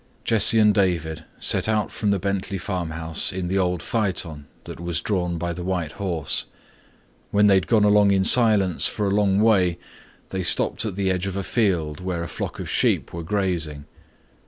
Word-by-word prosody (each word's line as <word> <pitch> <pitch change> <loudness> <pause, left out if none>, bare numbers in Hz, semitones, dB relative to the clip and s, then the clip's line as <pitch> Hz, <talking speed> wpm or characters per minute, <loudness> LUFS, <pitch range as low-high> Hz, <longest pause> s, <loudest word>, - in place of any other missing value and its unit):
Jesse 115 0 +5
and 105 -1 +5
David 85 -6 -1
set - - +2
out 110 -1 0
from 105 - -2
the 100 - +2
Bentley 100 +1 -3
farmhouse 85 -4 -3
in 90 -1 -4
the 95 +1 0
old 90 -3 -1
phaeton 90 -9 -3 0.2
that - - -9
was 85 -3 -3
drawn 90 -4 -2
by 85 +1 -3
the 90 +1 -7
white 90 -4 -2
horse. 85 -7 -3 0.8
When 105 0 +3
they 100 - +5
had 95 -2 +2
gone 110 -3 +3
along 105 -1 +4
in 95 -1 +2
silence 105 -5 +3
for 105 - -3
a 100 - 0
long 100 -1 +2
way 95 -6 +3 0.5
they 95 - -3
stopped 90 - +2
at 105 -4 -4
the 95 -1 0
edge 90 +1 -2
of 95 - -4
a 100 - -2
field 85 -10 -1
where 90 -2 -3
a - - -5
flock - - -6
of - - -5
sheep - - 0
were 85 - -5
grazing. 85 -6 -2
95 Hz, 190 wpm, -23 LUFS, 85-100 Hz, 0.8 s, Jesse